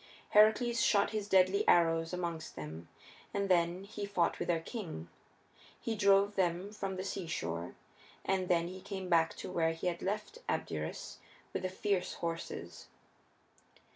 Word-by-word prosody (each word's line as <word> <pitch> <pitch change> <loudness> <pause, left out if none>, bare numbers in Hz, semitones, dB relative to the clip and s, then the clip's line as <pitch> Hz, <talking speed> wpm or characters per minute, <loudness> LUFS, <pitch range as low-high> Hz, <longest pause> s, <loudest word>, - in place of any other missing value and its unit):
Heracles 220 +3 +5
shot 200 -2 +4
his 215 -2 -2
deadly 190 +1 +5
arrows 165 -1 +4
amongst 170 -3 -4
them, 80 +2 -7 0.5
and 200 -1 0
then 175 +1 +2
he 205 +1 -7
fought 180 -4 +1
with - - -2
their 170 -2 +2
king. 165 - -6 0.7
He 230 - -2
drove 200 0 +4
them 185 +1 0
from 195 -3 -4
the 185 - -3
seashore, 90 - -3 0.5
and 190 -1 +1
then 170 -1 +3
he 185 +1 -8
came 190 -2 -5
back 165 -2 +3
to - - -6
where 165 -2 +2
he 165 - -7
had 175 -1 -1
left 210 - -3
Abderus - - -3 0.4
with - - -1
the 185 - -1
fierce 190 0 -1
horses. 165 0 -5
185 Hz, 150 wpm, -33 LUFS, 170-200 Hz, 0.7 s, Heracles